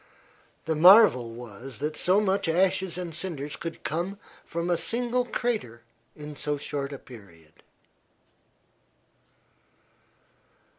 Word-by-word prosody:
The 160 - 0
marvel 155 - +7
was 120 +1 -10
that 150 +5 -3
so 185 +3 +3
much 200 -3 0
ashes 185 +1 +1
and 175 -2 -5
cinders 150 -4 -4
could 165 -1 -7
come 175 +6 -2 0.3
from 170 +1 -4
a - - +4
single 245 +5 0
crater 215 - -3 0.3
in 150 0 -9
so 150 0 -2
short 140 0 -4
a 140 - -6
period. 85 -12 -16
160 Hz, 110 wpm, -27 LUFS, 135-190 Hz, 0.3 s, marvel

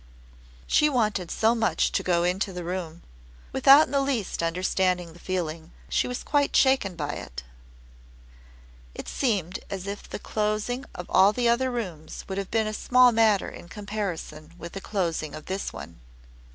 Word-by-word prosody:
She 300 - +4
wanted 210 - 0
so 225 +1 +2
much 225 -1 +1
to - - 0
go 175 -1 +1
into 185 +3 0
the 180 -1 -6
room. 175 -2 -5 0.5
Without 275 +3 +7
in - - -13
the 280 -1 +2
least 260 -11 -1
understanding 180 0 0
the 175 - -15
feeling, 165 -3 -4 0.2
she - - +1
was 250 0 -4
quite 290 -1 +1
shaken 265 -9 +3
by 145 -3 -3
it. 65 - -7 1.5
It - - -7
seemed 195 - -1
as 195 -1 -5
if 200 +1 -6
the - - -4
closing 215 +5 -2
of 175 - -6
all 195 +2 +5
the 240 +1 +1
other 245 +2 +2
rooms 185 -11 -5
would 195 0 -3
have 195 - -5
been 220 -1 +1
a 215 - -3
small 250 +3 +5
matter 220 -3 +3
in 175 - -12
comparison 190 -6 -5
with 170 0 -8
the 195 - -7
closing 170 -7 -2
of 155 - -9
this 190 +1 -3
one. 75 +2 -10
195 Hz, 170 wpm, -26 LUFS, 175-230 Hz, 1.5 s, Without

